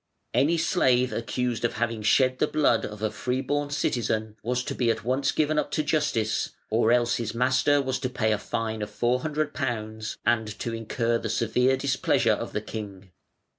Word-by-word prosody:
Any 160 Hz, +5 st, +3 dB
slave 130 Hz, -7 st, +2 dB
accused 120 Hz, 0 st, -2 dB
of 120 Hz, -, +1 dB
having 115 Hz, -1 st, -2 dB
shed 130 Hz, +4 st, +3 dB
the -, -, +3 dB
blood 145 Hz, -6 st, +2 dB
of 105 Hz, 0 st, -9 dB
a 110 Hz, -, +1 dB
free 125 Hz, +5 st, -2 dB
born 145 Hz, +1 st, -1 dB
citizen 110 Hz, -6 st, -1 dB
was 125 Hz, +2 st, -1 dB
to -, -, -4 dB
be 120 Hz, -2 st, +1 dB
at 110 Hz, -2 st, 0 dB
once 130 Hz, +4 st, +1 dB
given 155 Hz, 0 st, +1 dB
up -, -, -2 dB
to 155 Hz, -, +1 dB
justice; 145 Hz, -8 st, 0 dB, 0.2 s
or 115 Hz, +1 st, +3 dB
else 120 Hz, -1 st, +3 dB
his 115 Hz, -1 st, -4 dB
master 130 Hz, +4 st, +3 dB
was 130 Hz, -1 st, -1 dB
to 130 Hz, -, -2 dB
pay 110 Hz, -3 st, 0 dB
a 105 Hz, -, +1 dB
fine 110 Hz, -1 st, -3 dB
of 105 Hz, -, -3 dB
£400, 120 Hz, -3 st, -2 dB
and 115 Hz, -2 st, +2 dB
to 115 Hz, -, -4 dB
incur 115 Hz, +1 st, -1 dB
the 110 Hz, -, -4 dB
severe 125 Hz, +4 st, +2 dB
displeasure 135 Hz, 0 st, +2 dB
of -, -, -4 dB
the -, -, -2 dB
king. 100 Hz, -3 st, -8 dB
120 Hz, 185 wpm, -26 LUFS, 110-130 Hz, 0.2 s, Any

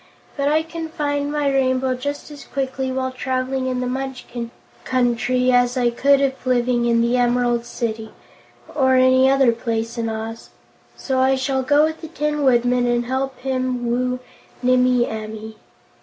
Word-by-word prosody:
But 280 Hz, -1 st, -1 dB
I 310 Hz, +2 st, +2 dB
can 325 Hz, 0 st, -6 dB
find 290 Hz, -3 st, -2 dB
my 295 Hz, -1 st, 0 dB
Rainbow 260 Hz, -1 st, +1 dB
just 285 Hz, +4 st, -5 dB
as 290 Hz, -2 st, -10 dB
quickly 265 Hz, 0 st, -3 dB
while 260 Hz, 0 st, -2 dB
traveling 260 Hz, 0 st, -2 dB
in 255 Hz, -1 st, -1 dB
the -, -, -1 dB
Munchkin 250 Hz, -2 st, -5 dB, 0.3 s
Country 250 Hz, 0 st, +1 dB
as 245 Hz, 0 st, +3 dB
I 240 Hz, -1 st, +2 dB
could 280 Hz, +3 st, +3 dB
if 270 Hz, -1 st, -1 dB
living 245 Hz, -1 st, +1 dB
in 235 Hz, -1 st, +3 dB
the 235 Hz, +2 st, +2 dB
Emerald 240 Hz, -1 st, +1 dB
City 220 Hz, -2 st, -4 dB, 0.6 s
or 260 Hz, -2 st, +3 dB
any 260 Hz, +1 st, +5 dB
other 270 Hz, -3 st, +4 dB
place 230 Hz, 0 st, -3 dB
in 225 Hz, -1 st, -1 dB
Oz 225 Hz, +1 st, -6 dB, 0.5 s
so 265 Hz, -1 st, -1 dB
I 265 Hz, +1 st, +4 dB
shall 265 Hz, 0 st, -1 dB
go 290 Hz, +3 st, +3 dB
with 315 Hz, 0 st, -1 dB
the 320 Hz, -, -7 dB
Tin 300 Hz, -1 st, -2 dB
Woodman 245 Hz, -2 st, +3 dB
and 240 Hz, 0 st, +1 dB
help 265 Hz, +1 st, -2 dB
him 255 Hz, -2 st, -2 dB
woo 250 Hz, +1 st, 0 dB, 0.4 s
Nimmie 250 Hz, -1 st, +3 dB
Amee." 220 Hz, 0 st, -7 dB
255 Hz, 165 wpm, -21 LUFS, 240-270 Hz, 0.6 s, any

